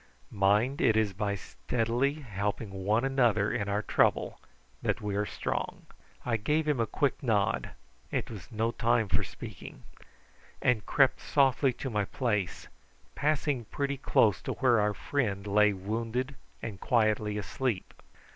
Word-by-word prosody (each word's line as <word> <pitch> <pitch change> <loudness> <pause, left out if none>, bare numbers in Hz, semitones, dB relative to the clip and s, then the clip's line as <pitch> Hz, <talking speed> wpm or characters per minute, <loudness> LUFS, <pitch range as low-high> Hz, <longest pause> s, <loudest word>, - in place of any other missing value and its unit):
Mind 105 +7 +2
it 110 -1 +4
is 105 -3 +2
by 100 +1 -1
steadily 120 +6 -1
helping 105 -6 -3
one 105 +6 +1
another 120 -7 +2
in 105 -3 -1
our 105 +1 0
trouble - - +1 0.4
that - - 0
we 105 -2 -3
are 105 0 0
strong." - - -3 0.4
I 115 -2 +1
gave 150 +8 0
him 150 -4 +1
a 115 - +1
quick 140 -2 0
nod 105 -7 +1 0.4
it - - -2
was 105 +1 -9
no 115 +1 0
time 115 -2 +1
for - - +1
speaking - - -9 0.8
and 120 -4 +2
crept 135 -2 +4
softly 135 -1 +3
to 135 +1 -5
my 105 -2 0
place, 105 -6 -2 0.5
passing 145 -4 0
pretty 140 +4 -2
close 115 -6 +3
to - - -3
where 125 -4 +3
our 105 0 +1
friend 105 -8 -1
lay 105 +1 +4
wounded 115 +7 -3 0.3
and 105 -4 -5
quietly 110 -3 +1
asleep. 105 0 -2
110 Hz, 145 wpm, -30 LUFS, 105-130 Hz, 0.8 s, it